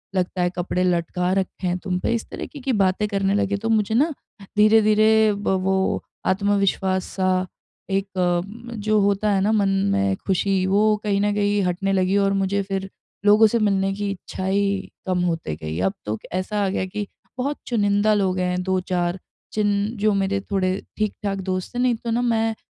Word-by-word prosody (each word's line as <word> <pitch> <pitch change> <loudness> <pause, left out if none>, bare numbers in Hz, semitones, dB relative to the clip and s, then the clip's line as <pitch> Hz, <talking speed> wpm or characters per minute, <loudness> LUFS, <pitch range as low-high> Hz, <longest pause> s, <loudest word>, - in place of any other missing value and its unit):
लगता 185 0 -1
है 175 - +2
कपड़े 180 +1 -1
लटका 180 0 0
रखे 190 -1 -2
हैं 180 0 0
तुम 180 -1 -2
पे।" 230 - 0
इस 230 - -3
तरीके 290 - -7
की 265 -1 -1
बातें 190 +3 +1
करने 195 -1 0
लगे। 200 -1 +1
तो 225 +3 -3
मुझे 220 -1 +2
ना 300 +6 +3 0.4
धीरे-धीरे 215 0 +5
ब 205 0 -3
वो 190 0 +1 0.2
आत्मविश्वास-सा 190 -1 +1 0.4
एक 195 0 -2
अम 185 +7 -1
जो 215 0 +2
होता 200 +1 +1
है 195 - +2
ना 205 +3 +2
मन 205 -3 +2 0.2
में 200 -1 +1
खुशी 190 0 +1
वो 210 +2 +3
कहीं 200 -2 +1
न 205 0 +1
कहीं 205 0 +1
हटने 185 +2 -1
लगी 190 0 +2
और 195 0 +2
मुझे 195 0 0
फिर 195 0 -4 0.4
लोगों 210 +2 +7
से 235 +2 0
मिलने 195 -2 +1
की 205 0 -3
इच्छा 190 0 -6
ही 200 0 0 0.2
कम 185 -1 0
होते 165 - -2
गई। 80 +1 -5
अब - - -2
तो 105 +1 -2 0.2
ऐसा 200 +3 -1
आ - - 0
गया 185 - -1
कि 205 +2 -5 0.3
बहुत 280 +3 -2
चुनिंदा 205 -2 +2
लोग 190 -3 +1
हैं 180 0 0
2-4 185 -1 -1 0.3
जिन 210 -1 +1 0.3
जो 210 +1 +2
मेरे 195 0 0
थोड़े 190 -2 +1 0.3
ठीक-ठाक 205 -2 -2
दोस्त 185 +3 -3
थे - - -1
नहीं 250 -1 +3
तो 230 +1 -5
ना 235 +2 +1
मैं 225 -2 +1
195 Hz, 185 wpm, -23 LUFS, 185-210 Hz, 0.4 s, लोगों